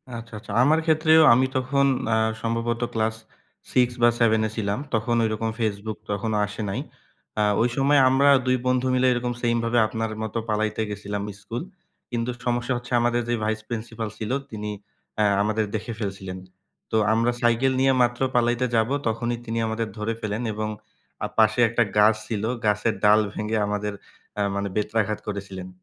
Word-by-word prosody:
আচ্ছা, 115 0 -9
আচ্ছা. 105 -1 -10
আমার 155 +4 +4
ক্ষেত্রেও 160 0 +5
আমি 130 +2 +4
তখন 140 +2 +1 0.3
আ - - +3 0.2
সম্ভবত 115 +1 -1
ক্লাস 110 0 0 0.6
6 125 -1 +5
বা 120 - +7
7 110 -2 +4
এ - - -6
ছিলাম। 100 0 -1
তখন 115 +1 +1
ওইরকম 110 0 -1
Facebook 110 -1 -2
তখনও 105 +1 -1
আসে 105 +2 -7
নাই। 95 - -2 0.6
আ - - +4 0.2
ওই 120 - +3
সময় 140 +1 +4
আমরা 135 +2 +4 0.2
২ 130 0 +3
বন্ধু 125 0 +2
মিলে 130 0 +3
এরকম 120 0 -2
সেম 120 -1 +1
ভাবে 120 +1 +2
আপনার 115 0 -3
মতো 110 +1 -4
পালাইতে 110 0 0
গেছিলাম 100 0 -4 0.2
স্কুল। 115 +3 -5 0.5
কিন্তু 120 0 -2 0.2
সমস্যা 120 +1 0
হচ্ছে 125 +1 -10
আমাদের 120 0 +1
যে 120 - +2
ভাইস 110 0 0
প্রিন্সিপাল 115 -1 -4
ছিল, 110 +2 -4 0.2
তিনি 105 -1 -5 0.5
অ্যা 105 - +2 0.2
আমাদের 110 +1 0
দেখে 115 +2 -4
ফেলছিলেন। 95 -3 -5 0.5
তো - - 0 0.2
আমরা 115 +2 +2
সাইকেল 120 +2 +3
নিয়ে 135 0 +4
মাত্র 120 0 +1 0.2
পালাইতে 120 +1 +2
যাব, 110 +1 +2 0.2
তখনই 120 +1 -1
তিনি 115 0 -3
আমাদের 110 0 -2
ধরে 105 +2 -2
ফেলেন 110 +2 -2
এবং 110 0 -3 0.6
আ - - -1
পাশে 110 +1 +4
একটা 120 +1 +2
গাছ 105 +1 +6
ছিল। 110 -3 -3 0.2
গাছের 105 +1 +1
ডাল 105 +1 +6
ভেঙে 110 +1 -2
আমাদের 105 0 -2 0.4
অ্যা 105 - 0
মানে 100 0 -2
বেত্রাঘাত 105 0 0
করেছিলেন। 95 -3 -5
115 Hz, 170 wpm, -24 LUFS, 105-120 Hz, 0.6 s, বা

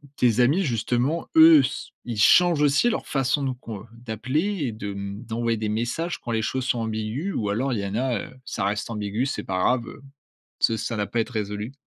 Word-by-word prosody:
tes 120 -1 +2
amis 145 +11 +4
justement, 125 +5 0
eux 160 -1 +9
s 135 - -2 0.2
ils 120 -3 -4
changent 170 +7 +5
aussi 145 +12 +4
leur - - -2
façon 135 +1 0
de 135 - 0
qu'on, 115 -5 -8
heu, - - -12
d'appeler 130 - -2
et 120 - -1
de 105 -2 -6
mmh, 100 +3 -6
d'envoyer 115 0 -1
des 110 -1 -2
messages 120 +11 -2
quand 120 - -6
les 110 - +1
choses 130 +3 -2
sont 120 - 0
ambiguës? 110 - -3
Ou 105 -2 -1
alors 125 +6 0
il 115 - -1
y 100 - -3
en 100 - -4
a, 125 -2 0
heu, - - -10
ça 95 - -3
reste 105 +3 -1
ambigu, 105 +2 -2
c'est 140 - -3
pas 95 -1 -2
grave, 120 +5 +2
heu, - - -10 0.6
ce 115 - +3
ça 110 +2 -3
n'a 105 -1 -1
pas 120 - -2
être 115 - -1
à - - +2
résolu? 105 +4 -5
120 Hz, 235 wpm, -24 LUFS, 110-135 Hz, 0.6 s, eux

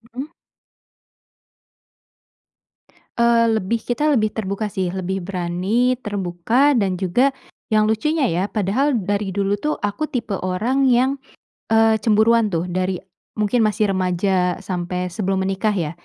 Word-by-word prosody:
Hmm. 260 - -3 3.0
Eee, 235 0 +4
lebih 220 +3 -2
kita, 295 +5 -1
lebih 215 -5 +1
terbuka 200 0 -3
sih. 190 -3 -1
Lebih 190 +1 -3
berani 190 +7 0
terbuka 205 +7 +1
dan 195 -4 +1
juga, 220 +9 +3 0.4
yang 215 0 +3
lucunya 280 +6 +1
ya, 175 +3 0
padahal 225 +8 +1
dari 200 0 -2
dulu 200 +1 0
tuh 300 +9 -2
aku 205 +9 -2
tipe 230 -6 -2
orang 240 +9 +1
yang, 255 +2 +3 0.6
eee, 225 0 +5
cemburuan 220 +1 +4
tuh. 170 +2 -1
Dari 185 +1 -1 0.4
mungkin 210 +3 +1
masih 210 -1 +1
remaja 180 0 0
sampai 180 0 -3
sebelum 190 0 -1
menikah 195 +3 0
ya. 165 -6 -2
205 Hz, 125 wpm, -21 LUFS, 185-230 Hz, 3.0 s, eee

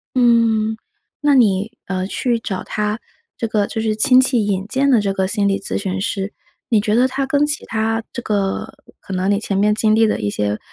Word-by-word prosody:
嗯， 230 -3 +3 0.5
那 290 -1 +3
你， 210 -4 +3
呃， 185 -1 -2
去 235 +4 -1
找 195 -4 -4
他 210 +1 -2 0.4
这 230 - -2
个 210 -2 +1
就 220 - -5
是 220 -1 0
亲 255 +4 +5
戚 255 -4 +2
引 195 -2 -1
荐 275 +4 +1
的 245 - +5
这 200 -1 -1
个 190 -1 0
心 205 +1 0
理 195 0 +1
咨 - - -3
询 190 -1 -3
师， 195 0 -3 0.3
你 220 -3 +2
觉 210 -1 0
得 245 +3 +4
他 270 +1 -2
跟 285 +2 +2
其 295 0 -1
他 225 +1 -1
这 240 - -5
个 200 -4 -2 0.3
可 195 - -8
能 185 +2 0
你 200 - +2
前 200 -2 -2
面 210 +1 +3
经 215 0 +2
历 225 0 +4
的 215 - 0
一 105 - -1
些， 105 +1 -2
215 Hz, 235 characters per minute, -19 LUFS, 195-235 Hz, 0.5 s, 亲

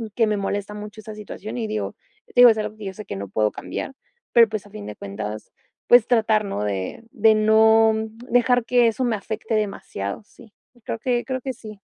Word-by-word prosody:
que 225 -2 +3
me 210 - +1
molesta 200 +1 -3
mucho 210 +1 -9
esa 215 0 -9
situación 215 +2 -7
y, 225 - -2
digo, 215 0 -3 0.3
te - - -20
digo, 245 - +10
es 220 - -1
algo 215 - -4
que 215 - -10
yo 190 - -5
sé 215 - -9
que - - -6
no 100 0 -5
puedo 105 +2 +1
cambiar, 270 - -6 0.4
pero 230 -2 +7
pues, 215 -2 -4
a - - -17
fin 105 - -8
de 105 - -7
cuentas, 105 +2 -6 0.4
pues 240 -2 +7
tratar 220 -3 +3
¿no?, 105 - -3
de 100 - -4
de 220 -4 +4
no, 220 +1 +5
mm, 220 0 -4
dejar 245 0 +3
que 245 -1 +4
eso 230 +3 -1
me 235 - +1
afecte 220 +2 -4
demasiado, 195 - -3
sí. 225 0 -18 0.3
Creo 225 - -4
que 240 0 0
creo 260 -1 -3
que 265 +1 -4
sí. 215 -3 -11
215 Hz, 220 wpm, -23 LUFS, 205-230 Hz, 0.4 s, digo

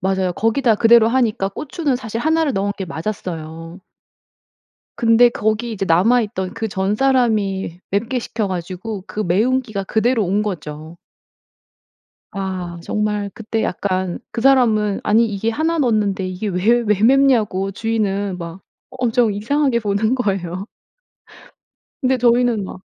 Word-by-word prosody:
맞아요. 190 -1 0
거기다 225 +3 +2
그대로 225 +1 +5
하니까 230 -5 +1
고추는 295 - -3
사실 230 -2 -5
1 320 +3 +2
를 285 - 0
넣은 200 +1 -1
게 190 - -4
맞았어요. 165 -1 -6 1.2
근데 235 +1 +5
거기 220 +1 -1
이제 195 -3 -3
남아있던 200 +2 +2
그 225 -1 -3
전사람이 205 -3 0
맵게 230 +6 0
시켜 225 -3 -3
가지고 185 +3 -5
그 - - -6
매운 225 +9 +2
기가 215 -5 -5
그대로 225 +2 +1
온 200 +4 +1
거죠. 160 -3 -6 1.4
아 185 -3 -4
정말 210 +1 -2
그때 225 -1 -3
약간 185 -1 -2
그 235 - -4
사람은 225 -6 +3
"아니 225 +2 +4
이게 210 +2 -2
1 320 +7 0
넣는데 210 -7 +1
이게 185 +4 -4
왜 205 +6 +2
왜 210 -1 +2
맵냐?"고 230 -7 +3
주인은 205 -3 -1
막 170 +2 -8 0.3
엄청 245 -3 +1
이상하게 250 +4 +1
보는 215 +3 0
거예요. 195 -5 -2 1.4
근데 260 0 +2
저희는 240 -2 +2
막 185 0 -9
210 Hz, 270 characters per minute, -19 LUFS, 190-235 Hz, 1.4 s, 그대로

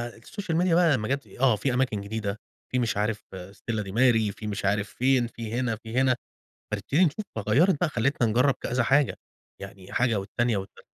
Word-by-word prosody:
الSocial 165 - -5
Media 180 -2 +2 0.2
لمّا 110 -4 -1
جات 140 +1 -2
آآ، - - -15
آه، 125 -5 +5
في 125 +5 -1
أماكن 125 -5 0
جديدة، 105 0 -4 0.3
في 125 - +1
مش 115 -4 0
عارف 105 0 -1
Stella 100 +4 -5
Di 95 - -7
Mare 115 -3 +3
في 105 - -6
مش 100 -1 -3
عارف 100 0 +1
فين، 125 0 +2
في 115 -1 -7
هنا، 120 -2 0
في 115 +2 -7
هنا، 130 -1 +4 0.6
فنبتدي 175 +6 +2
نشوف، 200 +7 -2
فغيّرت 130 - +3
بقى، 175 - +1
خلّتنا 120 -1 +1
نجرّب 125 +5 +3
كذا 125 0 0
حاجة، 135 +3 +3 0.5
يعني 95 -1 -10
حاجة 120 -4 +2
والتانية 115 +2 0
والتالتة. 95 - -8
115 Hz, 190 wpm, -26 LUFS, 105-130 Hz, 0.6 s, آه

